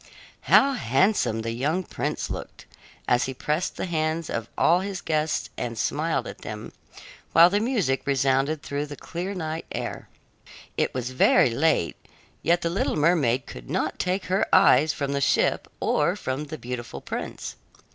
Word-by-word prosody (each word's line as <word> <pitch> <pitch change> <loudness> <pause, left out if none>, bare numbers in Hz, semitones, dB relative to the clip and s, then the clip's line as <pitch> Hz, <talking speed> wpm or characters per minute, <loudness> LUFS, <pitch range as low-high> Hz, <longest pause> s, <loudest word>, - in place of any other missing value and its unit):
How 275 0 +6
handsome 135 - +1
the 115 - -2
young 145 +10 -1
prince - - -3
looked, - - -7 0.4
as 120 0 +3
he 130 0 -5
pressed 150 +6 -2
the - - -2
hands 160 -1 -1
of 115 0 -3
all 175 +2 +4
his 195 0 -4
guests 155 -1 -1
and 115 -1 -4
smiled 150 +1 0
at - - -8
them, 105 0 -7 0.6
while 170 +2 +8
the 205 - +2
music 210 - 0
resounded 135 +2 +1
through 145 +1 -3
the 145 - -7
clear 180 +7 -5
night 160 -2 -4
air! - - -5 0.7
It - - 0
was 125 0 -3
very 130 -1 +4
late, 130 - +1 0.4
yet 170 +3 +2
the 170 - 0
little 190 - 0
mermaid 145 -6 +2
could - - -10
not - - -1
take 185 +1 -1
her 190 +2 +1
eyes 155 -6 +6
from 140 -1 -3
the 140 0 -1
ship - - +2
or - - +1
from 135 +3 -3
the 155 +2 -7
beautiful 120 -2 -6
prince. - - -5
150 Hz, 165 wpm, -25 LUFS, 130-170 Hz, 0.7 s, while